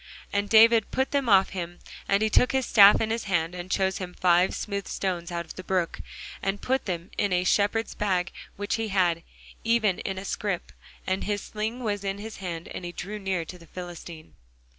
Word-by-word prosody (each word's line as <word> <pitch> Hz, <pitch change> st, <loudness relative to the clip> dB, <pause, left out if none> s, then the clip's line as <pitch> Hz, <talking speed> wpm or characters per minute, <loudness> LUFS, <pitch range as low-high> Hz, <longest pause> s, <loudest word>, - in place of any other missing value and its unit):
And 200 Hz, 0 st, 0 dB
David 225 Hz, 0 st, +6 dB
put 265 Hz, +1 st, 0 dB
them 275 Hz, -4 st, +1 dB
off 195 Hz, -2 st, +6 dB
him. 175 Hz, -2 st, -5 dB, 0.3 s
And 200 Hz, +2 st, +3 dB
he 220 Hz, -, +2 dB
took 250 Hz, -, +4 dB
his 265 Hz, -1 st, +1 dB
staff 205 Hz, -3 st, +8 dB
in 220 Hz, 0 st, 0 dB
his 230 Hz, 0 st, -2 dB
hand, 175 Hz, -3 st, 0 dB
and 180 Hz, 0 st, -7 dB
chose 190 Hz, -1 st, +1 dB
him 180 Hz, -2 st, -6 dB
five 180 Hz, 0 st, +4 dB
smooth 200 Hz, -2 st, -4 dB
stones 180 Hz, -2 st, -3 dB
out 170 Hz, 0 st, -3 dB
of -, -, -10 dB
the 185 Hz, -, -6 dB
brook, 185 Hz, -3 st, -1 dB, 0.4 s
and 195 Hz, +1 st, -1 dB
put 265 Hz, +4 st, 0 dB
them 175 Hz, -2 st, -4 dB
in 205 Hz, -2 st, +1 dB
a 180 Hz, 0 st, +2 dB
shepherd's 205 Hz, +4 st, +1 dB
bag 190 Hz, -3 st, 0 dB, 0.2 s
which 205 Hz, +2 st, -2 dB
he 225 Hz, 0 st, -2 dB
had, 180 Hz, -4 st, +2 dB, 0.4 s
even 225 Hz, -5 st, +2 dB
in 190 Hz, -1 st, -4 dB
a 190 Hz, -, -6 dB
scrip; 200 Hz, -3 st, -3 dB, 0.3 s
and 190 Hz, +1 st, -1 dB
his 205 Hz, -1 st, -2 dB
sling 220 Hz, +4 st, -4 dB
was 205 Hz, -3 st, -2 dB
in 195 Hz, 0 st, -2 dB
his 215 Hz, +2 st, -8 dB
hand: 170 Hz, -3 st, -5 dB
and -, -, -7 dB
he 175 Hz, -, -5 dB
drew 205 Hz, +4 st, -6 dB
near 190 Hz, -4 st, -2 dB
to 180 Hz, +2 st, -10 dB
the 170 Hz, -, -16 dB
Philistine. 170 Hz, -2 st, -9 dB
195 Hz, 210 wpm, -26 LUFS, 180-210 Hz, 0.4 s, staff